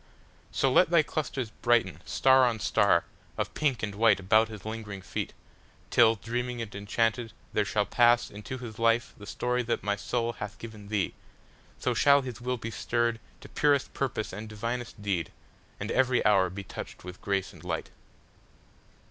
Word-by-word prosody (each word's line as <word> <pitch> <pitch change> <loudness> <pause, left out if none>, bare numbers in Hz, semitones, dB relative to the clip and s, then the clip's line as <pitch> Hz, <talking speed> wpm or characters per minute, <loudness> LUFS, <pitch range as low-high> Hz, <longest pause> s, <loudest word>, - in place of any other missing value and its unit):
So 135 - +2
let 170 +6 +5
thy 170 -2 +5
clusters 135 -6 -3
brighten, 120 +1 +1
star 130 -1 +5
on 115 -2 0
starOf 100 -4 +3 0.5
pink 140 -7 0
and 105 -1 -2
white 110 0 +4
about 110 +4 +4
his 105 -3 -10
lingering 110 -3 -6
feet, - - -4 0.6
Till, 115 -1 +6
dreaming 120 +3 -3
and 115 -2 -5
enchanted, 115 +3 -1 0.2
there 105 - +3
shall 105 0 +1
passInto 120 0 +2
his 115 -3 -8
life 115 0 +2
the 105 - -10
story 125 0 -1
that 120 -1 -2
my 100 0 +1
soulHath 115 -1 -3
given 110 -3 -10
thee. 100 -2 -1 0.6
So - - 0
shall 140 0 +5
his 125 -2 -7
will 125 +1 -1
be 115 0 -6
stirredTo 120 +1 0 0.3
purest 145 -2 +2
purpose 120 -7 -2
and 105 +3 -6
divinest 115 +2 -4
deed, 90 -6 -1 0.5
And 105 +3 -3
every 130 -1 +2
hour 95 -3 +4
be 100 +2 -7
touched - - -8
with 90 0 -9
grace 100 -1 -1
and - - -15
light. - - -3
115 Hz, 160 wpm, -28 LUFS, 105-125 Hz, 0.6 s, Till